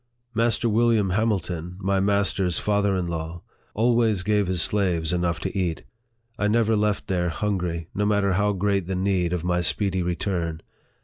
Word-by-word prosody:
Master 115 +1 +2
William 110 -3 +2
Hamilton, 90 -5 -1
my 100 0 +1
master's 100 -2 +1
father 100 -1 +1
in 90 -1 -1
law, 85 0 -5 0.3
always 115 -3 +2
gave 105 0 +1
his 90 -1 0
slaves 90 -5 +1
enough 85 -1 0
to - - -4
eat. 90 -4 -1 0.6
I 105 - +2
never 110 0 +2
left 105 -1 0
there 90 -2 0
hungry, 85 -2 -2
no 105 +1 0
matter 100 -2 +2
how 105 +2 +2
great 100 -1 0
the 95 - -2
need 90 -2 0
of 90 -2 -2
my 90 0 +1
speedy 95 +2 0
return. 85 -2 -2
95 Hz, 165 wpm, -24 LUFS, 90-105 Hz, 0.6 s, Master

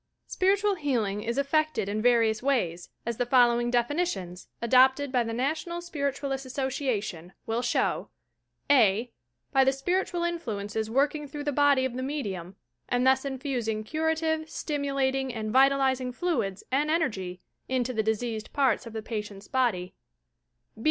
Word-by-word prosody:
Spiritual 400 +2 +2
healing 240 - -1
is 235 +4 -3
effected 310 -4 +1
in 210 +2 -1
various 230 -2 +3
ways, 185 -11 0 0.2
as 235 -1 -2
the 245 - 0
following 240 -1 +4
definitions, 240 - -1
adopted 260 +3 +4
by 250 -2 +2
the 230 - -4
National 310 +8 -2
Spirit 285 -6 -2
ualists' 270 -1 -3
Association, 250 - -3
will 225 +1 -1
show: - - 0 0.3
" - - -8 0.2
(a) 225 +5 -2 0.4
By 270 - +5
the 265 - +4
spiritual 350 +5 -1
influences 220 -11 -3
working 290 +4 +1
through 290 +1 -6
the 290 - 0
body 285 -2 +4
of 260 - -2
the 255 - -4
medium 200 - -4 0.3
and 245 0 +1
thus 265 +1 +4
infusing 255 -5 -2
curative, 315 +4 -1
stimu 285 -3 -3
lating 265 -1 +1
and 215 -1 -3
vitalizing 265 0 +3
fluids 245 - -2
and 290 +3 +1
energy 195 - -1 0.3
into 255 -1 0
the 220 - +1
diseased 220 0 -2
parts 270 -3 +2
of 225 - -9
the 220 -1 -5
patient's 210 -3 -6
body. 215 -9 0
260 Hz, 150 wpm, -27 LUFS, 220-285 Hz, 0.4 s, By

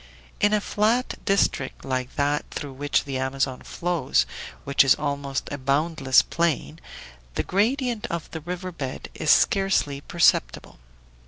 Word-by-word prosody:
In 205 - +3
a 210 - +3
flat 220 +5 0
district 175 -8 0
like 130 -1 -3
that 145 +1 0
through 140 -2 -6
which 145 +2 0
the 135 -2 -4
Amazon 130 0 -1
flows, 170 -6 0 0.4
which 140 0 +4
is 135 - +5
almost 140 -2 -3
a 145 - -4
boundless 140 0 +3
plain, 165 -1 -1 0.6
the - - 0
gradient 235 +3 0
of 170 -1 -4
the 160 - -6
river 180 +3 -5
bed 135 -6 -6
is 150 - -3
scarcely 190 -9 +3
perceptible. - - +1
145 Hz, 140 wpm, -24 LUFS, 135-180 Hz, 0.6 s, is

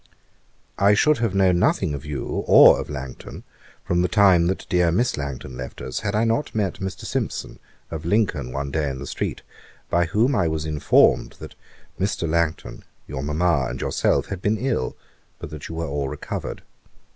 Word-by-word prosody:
'I 100 +1 +5
should 150 +7 +3
have 115 -5 0
known 95 -2 +3
nothing 75 - +1
of 70 0 -6
you 75 -3 -4 0.2
or - - +8
of - - -9
Langton, 65 -3 -8 0.4
from 85 0 +1
the 90 - +2
time 95 -5 +4
that 95 - -2
dear 90 -3 +2
Miss 120 +7 +1
Langton 65 -2 -6
left 65 0 -7
us, 65 0 -4
had 105 -1 -2
not 115 +6 0
I - - -1
met 100 -4 -1
Mr. 95 0 -5
Simpson, - - -3 0.3
of 80 -1 -5
Lincoln, 90 - 0
one 70 +2 -4
day 75 -1 0
in 65 - -5
the 70 - -7
street, - - -4 0.5
by 85 0 +3
whom 115 - +2
I 85 - +2
was 80 -1 -2
informed 75 -1 +3
that - - -9 0.5
Mr. 95 -3 -1
Langton, 85 0 -1 0.2
your 65 -1 -5
Mamma, 75 -1 +1
and - - -6
yourself, - - +1
had 100 -3 -6
been 105 +3 +1
all 125 - -4
ill, 115 - -1 0.4
but - - -8
that 75 -2 -8
you 80 - -6
were 85 0 -2
all 70 -1 -2
recovered. - - -6
85 Hz, 190 wpm, -23 LUFS, 70-100 Hz, 0.5 s, or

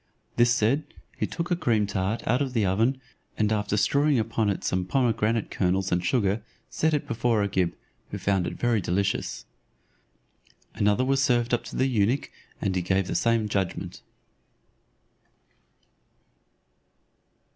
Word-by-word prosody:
This 120 0 +4
said, 120 +5 +2 0.3
he - - -2
took 170 +1 -4
a - - +4
cream 115 -10 +1
tart 100 +2 -2
out 125 +5 +2
of 135 -3 -2
the 110 -4 +2
oven, 115 +8 +1 0.4
and 105 0 +1
after 105 0 -1
strewing 140 +6 +3
upon 110 -1 0
it 100 - -2
some 95 0 0
pomegranate 115 0 0
kernels 95 +1 0
and 90 0 +1
sugar, 105 -1 +1 0.3
set 160 -1 +1
it 145 - -3
before 115 -2 +1
Agib, 95 -3 0 0.4
who - - -5
found 95 -3 0
it - - -5
very 120 -3 +1
delicious. 90 -9 -1 1.3
Another 105 +5 +2
was 135 +1 +2
served 120 -2 +2
up 120 - +1
to - - -8
the 130 - +2
eunuch, 120 +1 +1 0.3
and 95 -1 -1
he 90 - +1
gave 95 +2 +1
the - - -4
same 115 -2 +2
judgment. 100 -3 -3
110 Hz, 145 wpm, -26 LUFS, 100-125 Hz, 1.3 s, This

